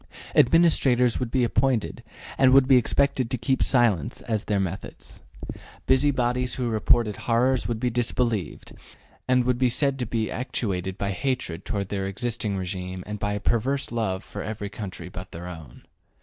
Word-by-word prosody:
Administrators 125 Hz, -6 st, +4 dB
would 125 Hz, -, -2 dB
be 130 Hz, +1 st, +1 dB
appointed 120 Hz, -1 st, 0 dB, 0.3 s
and 130 Hz, -1 st, +4 dB
would 135 Hz, -1 st, +6 dB
be 135 Hz, -, +6 dB
expected 130 Hz, 0 st, +2 dB
to 130 Hz, -, -1 dB
keep 135 Hz, 0 st, 0 dB
silence 115 Hz, -, +2 dB
as 110 Hz, -2 st, -1 dB
to -, -, -13 dB
their 105 Hz, -2 st, +1 dB
methods. 95 Hz, +1 st, -5 dB, 0.6 s
Busybodies 125 Hz, -2 st, +2 dB
who 125 Hz, -2 st, -2 dB
reported 110 Hz, 0 st, +2 dB
horrors 120 Hz, +3 st, +1 dB
would 115 Hz, -2 st, -2 dB
be 125 Hz, 0 st, 0 dB
disbelieved, 115 Hz, -3 st, -2 dB, 0.5 s
and 125 Hz, -1 st, +3 dB
would 125 Hz, -1 st, +1 dB
be 130 Hz, -1 st, +3 dB
said 135 Hz, +2 st, +1 dB
to 125 Hz, -, -2 dB
be 110 Hz, -1 st, -2 dB
actuated 95 Hz, -6 st, -3 dB
by 100 Hz, 0 st, -2 dB
hatred 100 Hz, -5 st, -3 dB
toward 100 Hz, -2 st, -3 dB
the 100 Hz, -1 st, -2 dB
existing 105 Hz, 0 st, -2 dB
regime 90 Hz, 0 st, -5 dB
and 105 Hz, 0 st, -6 dB
by 105 Hz, +1 st, -1 dB
a 105 Hz, -, -2 dB
perverse 125 Hz, +5 st, 0 dB
love 110 Hz, -5 st, -2 dB
for -, -, -7 dB
every 105 Hz, -2 st, -5 dB
country 95 Hz, -5 st, -7 dB
but 90 Hz, +1 st, -9 dB
their 85 Hz, +2 st, -8 dB
own. 80 Hz, -4 st, -10 dB
115 Hz, 170 wpm, -25 LUFS, 100-125 Hz, 0.6 s, would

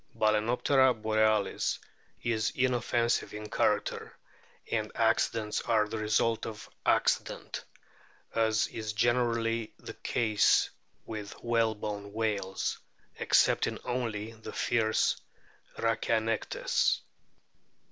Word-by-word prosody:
Balcenoptera 120 Hz, +4 st, +3 dB
borealis 110 Hz, -2 st, +1 dB, 0.5 s
is 110 Hz, -2 st, +1 dB
inoffensive 120 Hz, -3 st, +1 dB
in 105 Hz, 0 st, -7 dB
character, 105 Hz, -, 0 dB, 0.5 s
and -, -, -1 dB
accidents 110 Hz, -2 st, +1 dB
are 110 Hz, -2 st, +2 dB
the 110 Hz, +1 st, -4 dB
result 110 Hz, +1 st, +1 dB
of 110 Hz, -1 st, -8 dB
" -, -, -43 dB
acci -, -, +1 dB
dent," -, -, -7 dB, 0.7 s
as 110 Hz, -1 st, +2 dB
is 110 Hz, -1 st, -4 dB
generally 115 Hz, -1 st, +1 dB
the -, -, -9 dB
case 110 Hz, -3 st, +2 dB, 0.3 s
with 105 Hz, -2 st, -6 dB
whalebone 105 Hz, -3 st, -1 dB
whales, 105 Hz, -4 st, -1 dB, 0.4 s
excepting -, -, +3 dB
only 115 Hz, -4 st, -2 dB
the 110 Hz, -1 st, -10 dB
fierce 110 Hz, -2 st, +1 dB, 0.6 s
Rhachianectes. 115 Hz, -1 st, +1 dB
110 Hz, 95 wpm, -30 LUFS, 105-115 Hz, 0.7 s, Balcenoptera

